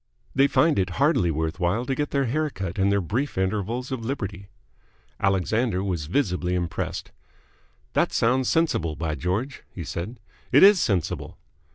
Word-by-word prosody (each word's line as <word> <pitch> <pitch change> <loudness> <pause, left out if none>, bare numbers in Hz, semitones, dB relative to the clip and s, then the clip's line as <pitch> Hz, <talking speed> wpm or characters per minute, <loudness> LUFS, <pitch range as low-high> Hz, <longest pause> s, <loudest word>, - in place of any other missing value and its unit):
They 135 +1 +4
find 155 -3 +3
it 95 -1 +1
hardly 140 - +3
worth 80 +2 -2
while 95 +7 0
to 135 - -1
get 145 +2 -1
their 140 -1 +1
hair 155 +6 0
cut 95 -6 -5
in 95 +1 +3
their 100 0 +2
brief 120 - -2
intervals 105 +7 -1
of 130 -3 -3
liberty." 100 -6 -4 0.7
Alexander 95 +2 +1
was 85 -6 -2
visibly 90 - 0
impressed. 90 -1 -3 0.8
"That - - +2
sounds 125 +2 +2
sensible, 150 - +1
by 80 0 -2
George!" 95 - -2
he 85 - -7
said. 90 - -5 0.3
"It - - +7
is 200 -1 +8
sensible." 95 -6 -1
100 Hz, 160 wpm, -25 LUFS, 90-130 Hz, 0.8 s, is